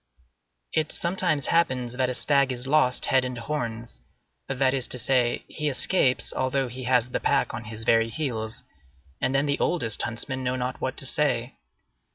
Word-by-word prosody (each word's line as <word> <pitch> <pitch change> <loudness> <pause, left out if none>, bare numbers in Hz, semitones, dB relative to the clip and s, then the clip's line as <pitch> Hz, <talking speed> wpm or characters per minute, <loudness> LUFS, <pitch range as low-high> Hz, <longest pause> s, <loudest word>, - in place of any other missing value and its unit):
It 155 -1 0
sometimes 170 -5 0
happens 130 -8 +1
that 130 0 0
a 125 - -2
stag 140 -1 +2
is 125 0 -2
lost 135 -3 +3
head 130 -1 +3
and 125 -1 -4
horns; 115 - -4 0.5
that 135 -1 +1
is 130 -2 0
to - - 0
say, 125 0 +1
he 150 -2 -2
escapes 135 -1 +2
although 130 0 0
he 125 +1 -7
has 125 -1 +2
the - - -1
pack - - +1
on 110 - -6
his 110 +1 -6
very 115 0 +3
heels, 115 -6 -3 0.6
and 130 - +1
then 135 +1 +3
the 140 -1 0
oldest 115 - 0
huntsmen 130 +3 -4
know 125 0 0
not 125 0 -3
what - - -2
to - - 0
say. - - +1
130 Hz, 180 wpm, -26 LUFS, 120-140 Hz, 0.6 s, lost